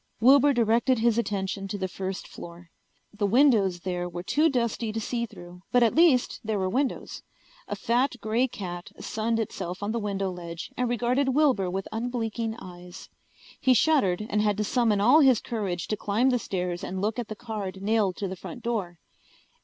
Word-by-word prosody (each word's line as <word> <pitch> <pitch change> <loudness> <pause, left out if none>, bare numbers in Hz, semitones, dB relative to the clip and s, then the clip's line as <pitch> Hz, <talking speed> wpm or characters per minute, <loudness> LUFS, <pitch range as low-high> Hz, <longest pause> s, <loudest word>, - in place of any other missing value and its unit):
Wilbur 275 +5 +6
directed 235 +1 +2
his 235 0 +2
attention 195 -2 -2
to 205 - -4
the 190 -1 -2
first 190 0 -5
floor. 170 0 -11 0.4
The 205 -1 0
windows 210 -7 +4
there 180 -1 -3
were 175 0 -6
too 300 - +3
dusty 235 -4 -1
to 225 - -3
see 235 +2 -2
through, 175 -2 -12
but 245 -1 +5
at 230 - +3
least 315 -7 +4
there 220 -1 -1
were 190 -1 0
windows. 265 +4 -2 0.5
A - - -3
fat 245 +3 +1
grey 230 +4 +1
cat 175 -6 -7
sunned 225 +1 -1
itself 190 -3 -4
on 205 - -1
the 235 - -1
window 195 -2 -2
ledge 170 -1 -7
and 250 -1 0
regarded 245 +3 +1
Wilbur 260 -11 +3
with 190 +1 -3
unblinking 225 -1 -2
eyes. 180 -2 -11 0.5
He 260 -1 +4
shuddered 215 - +2
and 210 -1 0
had 210 -1 +1
to 210 - 0
summon 220 -1 +2
all 250 +10 +6
his 265 -6 +5
courage 200 -7 -3
to 215 - +1
climb 225 +7 +1
the 245 - +1
stairs 180 -4 -3
and 190 +1 -4
look 215 +4 -1
at 235 - -3
the 215 - -6
card 205 -4 -6
nailed 210 -3 +1
to 200 - -2
the 190 - -5
front 240 +7 -9
door. 200 -7 -2
215 Hz, 190 wpm, -27 LUFS, 190-240 Hz, 0.5 s, Wilbur